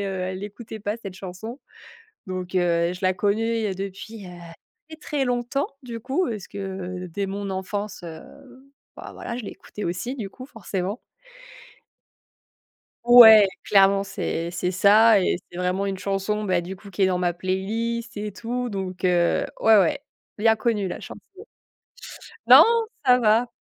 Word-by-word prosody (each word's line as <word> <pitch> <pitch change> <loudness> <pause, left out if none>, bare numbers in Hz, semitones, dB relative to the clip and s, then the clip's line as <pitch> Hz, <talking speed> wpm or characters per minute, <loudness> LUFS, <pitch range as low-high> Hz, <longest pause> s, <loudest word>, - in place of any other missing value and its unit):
elle 185 -1 -4
écoutait 215 +2 -8
pas 205 +2 -3
cette 195 -5 -9
chanson, 195 +8 -8 0.7
donc 185 -1 -6
heu, 170 -1 +1
je 180 - -8
la 185 -1 +1
connais 215 +2 0
depuis, 195 +2 -7
heu, - - -9 0.6
très, 315 - -9
très 295 -2 -2
longtemps 245 +2 -1
du 235 -2 -7
coup, 270 +10 -1
parce 210 -5 -5
que 190 -2 -6
dès 190 +4 -4
mon 200 +1 -4
enfance, 195 +1 -4
heu, 165 -2 -8 0.8
bah - - -9
voilà 235 - -6
je 245 - -7
l'ai - - -6
écouté 210 - -8
aussi 180 +9 -3
du 210 -6 -5
coup 255 +6 -11
forcément. 205 -4 -5 2.1
Ouais 225 -4 +9 0.2
clairement 195 -1 +4
c'est 170 -3 -3
c'est 180 +1 -2
ça 210 +4 +5
et 180 - +1
c'est 175 - -11
vraiment 180 +2 -1
une 195 -1 -2
chanson 200 +2 -2
bah 185 -3 +1
du 180 +3 -7
coup 200 +1 -14
qui 195 - -8
est - - +6
dans 185 -1 +1
ma 175 -1 0
playlist 225 +6 -3
et 210 0 -4
tout 245 +5 -4
donc 190 -3 -5
heu, 175 -1 +2
ouais, 220 -1 +6
ouais, 185 -4 +1 0.3
bien 225 +1 +3
connue 220 -3 -1
la 180 - -5
chanson. - - -10 1.3
Non, - - +10 0.4
ça 250 -1 +5
va. 225 +1 +3
200 Hz, 160 wpm, -24 LUFS, 185-225 Hz, 2.1 s, Non